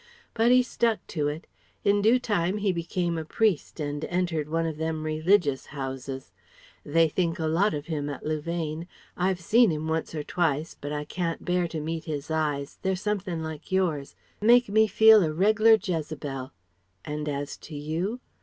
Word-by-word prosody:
But 230 +1 +3
he 250 0 +6
stuck 230 -4 0
to 150 -3 0
it. 150 +3 -4 0.4
In 205 0 +3
due 225 +4 +5
time 205 -6 0
he 205 -2 +1
became 170 0 -2
a - - -4
priest 190 -1 0
and 145 0 -3
entered 175 -4 -1
one 165 +1 0
of 160 -2 -3
them 160 0 -2
religious 155 -2 +2
houses. 135 -1 -6 0.5
They 165 +2 +3
think 170 +2 -1
a 160 - -2
lot 170 +5 +2
of 145 0 -5
him 150 -3 -3
at 145 - -7
Louvain. 155 +1 -3 0.3
I've 185 0 0
seen 225 +6 +4
him 155 0 -3
once 160 0 -2
or 150 - -3
twice 160 -2 -1
but 145 0 -7
I 150 0 -3
can't 170 +1 -3
bear 180 -1 +1
to 165 -1 -5
meet 160 +1 -4
his 150 -1 -4
eyes 150 -3 -2
they're 190 0 0
somethin' 185 -4 -2
like 160 +4 -7
yours 170 -7 0 0.3
make 240 +1 +5
me 220 +2 +4
feel 220 +1 +7
a 155 - 0
reg'lar 215 +6 +5
Jezebel. 150 -8 -4 0.5
And 150 0 -3
as 145 0 -3
to 155 - -10
you? 165 +11 -3
165 Hz, 180 wpm, -27 LUFS, 150-190 Hz, 0.5 s, feel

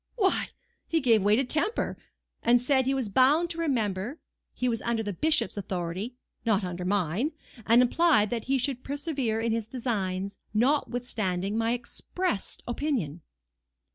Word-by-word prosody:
"Why, 390 -6 +2 0.4
he 330 - +2
gave 230 -7 +4
way 205 +2 +4
to 265 - +2
temper, 310 - +1 0.5
and 240 +1 +5
said 260 +1 +2
he 270 - +2
was 260 -4 -1
bound 285 - +4
to 335 - -6
remember, 235 - -1 0.3
he 250 - -2
was 230 -2 0
under 235 -1 -1
the 205 -1 -3
bishop's 300 - +1
authority, 190 +4 -3 0.3
not 215 -3 +2
under 180 0 -4
mine; 200 - 0 0.3
and 235 +2 +6
implied 270 -5 +3
that 235 -2 -2
he 270 +1 +2
should 255 0 -2
persevere 275 -6 -2
in 230 0 0
his 225 -1 -1
designs, 200 -6 -2 0.2
notwithstanding 220 -7 0
my 225 +1 +1
expressed 245 - -2
opinion." 235 - -2
235 Hz, 150 wpm, -28 LUFS, 205-270 Hz, 0.5 s, and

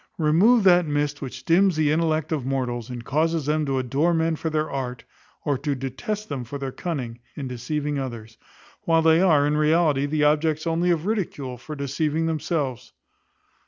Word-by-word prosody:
Remove 185 +9 +4
that 180 -3 +5
mist 145 0 -1
which 130 -1 -7
dims 185 +2 +4
the 155 -1 +2
intellects 160 -1 0
of 145 -5 -2
mortals, 125 -3 -2
and 120 -2 -7
causes 160 +1 0
them 150 0 0
to 135 -1 0
adore 140 +7 +1
men 165 0 +1
for 160 - -3
their 155 0 0
art, 125 -4 -4 0.4
or 140 -3 0
to 145 0 -1
detest 135 - -4
them 135 -4 -4
for 125 +4 -6
their 135 -1 -4
cunning, 125 -8 -5 0.2
in 140 -3 -5
deceiving 145 +4 -3
others, 115 -4 -6 0.5
when 165 -1 +3
they 160 +1 +5
are, 155 -6 +4
in 150 +1 +1
reality, 150 -2 +2
the 150 0 0
objects 155 +1 +2
only 170 +2 +1
of 170 -1 +1
ridicule, 170 - -2
for 150 +5 -8
deceiving 150 +3 -1
themselves. 155 -5 -2
150 Hz, 180 wpm, -24 LUFS, 135-165 Hz, 0.5 s, that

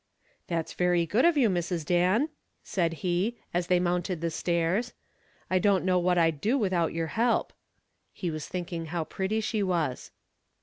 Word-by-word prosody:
"That's 165 -2 -2
very 175 -1 +2
good 215 - +2
of 340 -3 +4
you, 255 -5 +5
Mrs. 175 -4 -1
Dan," 185 - +2 0.3
said 170 -4 0
he, 185 +7 0 0.2
as 175 0 0
they 180 -1 +3
mounted 180 0 -1
the 165 0 -2
stairs. 175 +8 0 0.5
"I 185 - +2
don't 195 -2 +2
know 185 -1 +3
what 180 0 +2
I'd 165 -4 +2
do 235 - +2
without 185 -8 +1
your 165 0 -2
help." 235 +1 +1 0.6
He 175 -3 -4
was 155 -1 -5
thinking 170 -2 -4
how 165 0 -2
pretty 195 +6 -2
she 215 0 -1
was. 170 -9 -1
180 Hz, 170 wpm, -28 LUFS, 170-200 Hz, 0.6 s, you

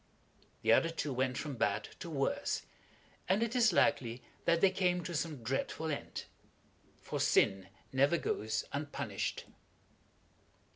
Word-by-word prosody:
The - - +4
other 165 - +4
two 150 -4 -3
went 130 0 0
from 145 -4 -4
bad 100 -3 0
to 170 - -6
worse, 140 -4 -1 0.7
and 195 +5 +3
it 230 +1 -2
is 240 -3 +5
likely 130 -7 +2 0.2
that 170 0 +4
they 190 +1 +5
came 180 -2 +1
to 175 - -5
some 150 -5 -3
dreadful 135 +6 -2
end. 145 - -5 0.8
For - - -3
sin 95 -1 +3 0.2
never 140 +5 +4
goes 110 -5 -1
unpunished. 140 -7 -3
145 Hz, 135 wpm, -34 LUFS, 125-170 Hz, 0.8 s, is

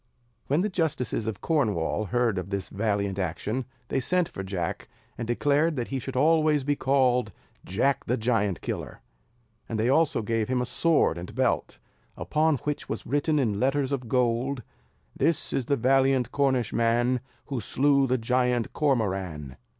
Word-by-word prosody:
When 145 +5 +2
the 210 - 0
justices 145 - -1
of 110 -4 -4
Cornwall 110 - 0
heard 115 -2 +1
of 90 +1 -6
this 100 -1 -3
valiant 100 -2 -1
action, 105 +8 -2 0.2
they - - +1
sent 180 +6 +1
for - - -6
Jack, 95 -3 -4 0.3
and 120 - -5
declared 145 +6 +2
that 120 -3 -3
he 135 - -2
should 135 +1 -6
always 155 +1 +3
be 145 +2 +1
called 130 -5 +2 0.3
Jack 130 +8 0
the 125 - 0
Giant 110 -5 0
Killer; - - -5 0.7
and 110 - -2
they 115 +3 +2
also 145 -5 +2
gave 110 0 0
him 130 0 0
a 125 - 0
sword 155 - +2
and 90 +6 -8
belt, 130 +1 0 0.4
upon 155 0 +1
which 150 -1 -3
was - - -4
written 145 +4 +1
in 110 -8 +1
letters 135 +2 +1
of 130 -4 -2
gold: 125 +1 0 0.5
"This 165 -2 0
is 130 -3 -1
the 140 - +2
valiant 130 0 +3
Cornishman 120 -2 +1 0.3
Who 135 -3 -2
slew 140 +5 +2
the 130 +1 +2
Giant 125 0 0
Cormoran." 95 - -1
125 Hz, 160 wpm, -27 LUFS, 110-140 Hz, 0.7 s, always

